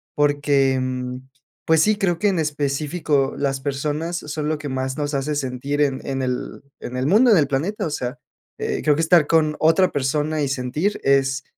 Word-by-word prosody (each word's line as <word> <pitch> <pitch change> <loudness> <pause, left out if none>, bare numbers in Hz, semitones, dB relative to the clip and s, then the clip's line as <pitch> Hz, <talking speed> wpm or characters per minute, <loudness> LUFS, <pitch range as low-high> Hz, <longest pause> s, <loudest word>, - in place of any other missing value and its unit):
porque, 145 -2 +2
em, 130 0 -4 0.4
pues, 160 -1 +4
sí, 215 +3 +3
creo 180 -5 0
que 210 - +2
en 185 - 0
específico 145 -1 -1
las 135 -1 -1
personas 150 +5 -2
son 150 -1 -4
lo 155 - 0
que 145 -1 -7
más 130 +1 -3
nos 145 0 -2
hace 145 +2 -1
sentir 140 +2 -2
en 135 -2 +1
en 135 -1 -2
el 125 -1 -4 0.2
en 125 - -6
el 130 +1 0
mundo, 225 +7 +5
en 200 - +6
el 145 - +3
planeta, 175 +10 -2
o - - -3
sea, 125 0 -4 0.4
eh, - - -2
creo 150 -1 +3
que 160 - 0
estar 165 -2 +4
con 155 -2 +2
otra 175 +4 +4
persona 150 +2 -1
y - - 0
sentir 140 +9 -1
es 135 0 +2
145 Hz, 195 wpm, -22 LUFS, 135-155 Hz, 0.4 s, en